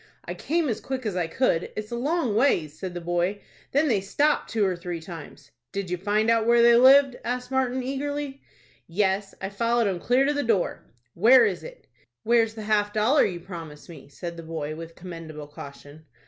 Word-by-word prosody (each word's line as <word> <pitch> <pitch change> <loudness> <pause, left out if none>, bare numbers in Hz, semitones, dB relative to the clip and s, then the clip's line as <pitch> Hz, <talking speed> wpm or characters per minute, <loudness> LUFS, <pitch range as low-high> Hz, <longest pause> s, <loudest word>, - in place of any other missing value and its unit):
"I - - -4
came 330 0 -1
as 230 - -2
quick 260 -2 -4
as 205 -4 -2
I 175 -2 0
could. 165 -2 0
It's 215 +1 -6
a - - -2
long 265 -2 0
ways," 195 - +2
said 180 +3 -7
the 175 - -4
boy. 175 +4 -1 0.3
"Then 290 +3 +2
they 215 -8 +2
stopped 290 +10 +1
two 220 -3 +1
or 185 -2 0
three 175 -1 -5
times." 160 -4 -11 0.2
"Did 195 -2 -4
you 180 - 0
find 210 +4 0
out 225 -1 +2
where 235 0 +5
they 235 0 +7
lived?" 265 +1 +6
asked 250 +1 -3
Martin, 260 -1 0
eagerly. 275 +1 -4 0.5
"Yes, 195 +2 0
I 190 - -3
followed 230 +3 +1
'em 190 -3 -1
clear 250 +8 +2
to 290 - +1
the 290 - 0
door." 225 -8 -1 0.2
"Where 235 +6 +6
is 200 -4 -2
it?" - - -11 0.4
"Where's 225 -1 +2
the 220 - -7
half 210 -1 +1
dollar 230 +8 +4
you 175 -3 -4
promised 165 -5 -9
me?" 160 -4 -12
said 170 +3 -7
the - - -6
boy, 160 -2 -5
with 165 +1 -9
commendable 165 -4 -8
caution. 145 +1 -12
210 Hz, 205 wpm, -25 LUFS, 175-250 Hz, 0.5 s, they